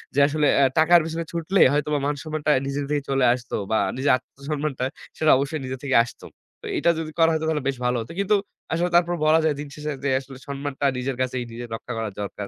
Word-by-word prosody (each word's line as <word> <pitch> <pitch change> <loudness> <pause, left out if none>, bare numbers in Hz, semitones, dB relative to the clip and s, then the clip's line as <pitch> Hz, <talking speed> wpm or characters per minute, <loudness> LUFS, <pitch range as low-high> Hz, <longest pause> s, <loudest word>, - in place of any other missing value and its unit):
যে, - - +3
আসলে 150 0 +1
অ্যা 140 - +5
টাকার 170 +2 +6
পেছনে 165 +1 -3
ছুটলে 170 +3 0
হয়তো 150 +1 0
বা - - +1
মান-সম্মানটা 150 +1 -1 0.2
নিজের 140 +1 -2
থেকে 150 -1 0
চলে 135 -1 +2
আসতো, 125 -1 -5 0.2
বা 110 - +3 0.2
নিজের 135 +2 +2
আত্মসম্মানটা, 140 +1 -4 0.3
সেটা 155 -1 +4
অবশ্যই 140 +3 -2
নিজে 130 +1 -4
থেকেই 135 -3 +3
আসতো। 120 - -11 0.4
তো - - -11
এটা - - +2
যদি 160 -1 -5
করা 165 0 +6
যেত, - - +1
হয়তো 160 - -3
তাহলে 150 -3 -1
বেশ 135 -1 -1
ভালো 125 0 +1
হতো। 115 - -8
কিন্তু 200 +1 +3 0.4
আসলে 175 +2 +1
তারপর 175 0 +4
বলা 155 +1 +5
যায়, 155 -2 +2
দিন 145 - -5
শেষে 150 0 -4
যে 140 - +1
আসলে 135 -1 -11
সম্মানটা 140 0 -4
নিজের 130 +1 -2
কাছেই 130 -1 -1
নিজের 120 +1 -7
রক্ষা 125 +2 -7
করা 110 -1 -2
দরকার। 100 0 -5
145 Hz, 225 wpm, -24 LUFS, 130-155 Hz, 0.4 s, টাকার